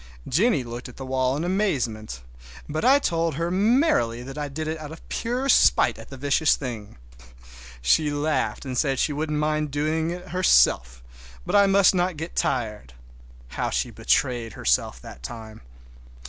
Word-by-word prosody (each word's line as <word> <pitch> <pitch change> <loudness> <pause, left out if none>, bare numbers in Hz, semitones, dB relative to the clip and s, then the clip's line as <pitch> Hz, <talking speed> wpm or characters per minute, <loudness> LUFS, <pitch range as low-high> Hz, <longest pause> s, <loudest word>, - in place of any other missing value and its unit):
Jennie 170 - +2
looked 120 +1 -7
at 125 - -14
the 135 - -7
wall 130 0 0
in 155 - -3
amazement, 125 - -2 0.4
but 155 +1 -3
I 270 +3 +6
told 165 - -1
her 170 +3 -2
merrily 200 - +2
that 135 +1 -9
I 150 -1 -3
did 155 +3 -5
it 160 0 -3
out 150 -1 -8
of 165 - -12
pure 250 +3 -2
spite - - +4
at - - -12
the 135 - -9
vicious 145 +3 +2
thing. 115 - -7 0.9
She 150 - +3
laughed 145 0 -1
and 130 -1 -4
said 135 0 +1
she 150 - 0
wouldn't 150 +1 -2
mind 150 0 0
doing 155 +3 -1
it 180 +1 -7
herself, - - +3 0.4
but - - -1
I 200 -1 +6
must 195 0 +5
not 180 -2 0
get 160 +3 -6
tired. 105 - -2 0.6
How - - -2
she - - -2
betrayed 120 -4 0
herself 60 0 0
that 60 - -11
time! 110 - -9
145 Hz, 170 wpm, -24 LUFS, 120-170 Hz, 0.9 s, I